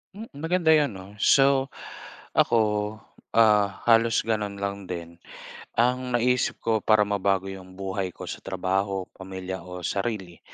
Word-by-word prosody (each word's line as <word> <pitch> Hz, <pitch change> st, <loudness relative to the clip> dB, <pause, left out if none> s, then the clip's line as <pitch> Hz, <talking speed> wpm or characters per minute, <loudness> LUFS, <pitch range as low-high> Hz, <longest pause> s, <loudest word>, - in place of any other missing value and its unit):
M. 215 Hz, -, -7 dB, 0.2 s
Maganda 165 Hz, 0 st, +2 dB
'yon, 150 Hz, -8 st, +3 dB
'no? 95 Hz, 0 st, -9 dB
So, 135 Hz, +2 st, +4 dB, 0.7 s
ako, 115 Hz, -, +4 dB, 0.8 s
ah, 105 Hz, -3 st, +4 dB
halos 115 Hz, 0 st, +4 dB
gano'n 105 Hz, -3 st, -1 dB
lang 100 Hz, 0 st, -4 dB
din. 85 Hz, -1 st, -7 dB, 0.6 s
Ang 125 Hz, +1 st, +1 dB
naisip 125 Hz, +1 st, +1 dB
ko 110 Hz, -1 st, +2 dB
para 110 Hz, -1 st, +5 dB
mabago 100 Hz, -1 st, 0 dB
'yong 95 Hz, -1 st, -11 dB
buhay 95 Hz, -1 st, -3 dB
ko -, -, -9 dB
sa -, -, -5 dB
trabaho, 95 Hz, +1 st, -1 dB
pamilya 95 Hz, 0 st, -6 dB
o 90 Hz, -1 st, -8 dB
sarili, 95 Hz, -3 st, -3 dB
100 Hz, 135 wpm, -26 LUFS, 95-120 Hz, 0.8 s, para